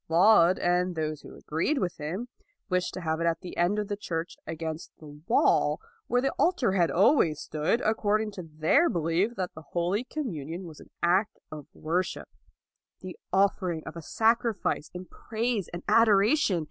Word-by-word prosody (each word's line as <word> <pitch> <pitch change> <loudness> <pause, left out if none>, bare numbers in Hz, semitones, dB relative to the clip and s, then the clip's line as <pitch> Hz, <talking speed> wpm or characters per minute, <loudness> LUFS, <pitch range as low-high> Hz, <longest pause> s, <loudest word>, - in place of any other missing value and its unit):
Laud 175 +1 +5
and 180 0 +1
those 155 -2 -3
who - - -12
agreed 165 - -1
with 185 -8 -2
him 175 +11 -4 0.4
wished 180 -1 0
to 185 - -5
have 160 -1 -1
it 170 - +1
at 165 -1 0
the 180 - -8
end 175 +4 +2
of 210 -1 -2
the 205 - -2
church 170 -4 -4
against 160 0 -5
the 150 -2 -12
wall, 235 - +3 0.3
where 245 0 +2
the 270 - 0
altar 335 - +2
had 175 -3 +3
always 180 - +3
stood, 155 +10 -1
accord 215 -1 +1
ing 215 -1 -4
to 195 - -7
their 160 - +2
belief 170 +7 0
that 185 -3 -3
the 155 - -10
Holy 175 - -1
Com 305 +4 -4
munion 165 - -5
was 160 -4 -10
an - - -15
act 185 +5 +2
of 150 -2 -8
worship, 175 +4 -2 0.7
the 185 -1 -8 0.2
offer 190 -1 +2
ing 160 -2 -5
of - - -8
a 170 - -6
sacrifice 225 -2 0
of 180 +1 -7
praise 225 -4 -2
and 175 +1 -7
adoration. 215 - +4
180 Hz, 185 wpm, -28 LUFS, 165-215 Hz, 0.7 s, Laud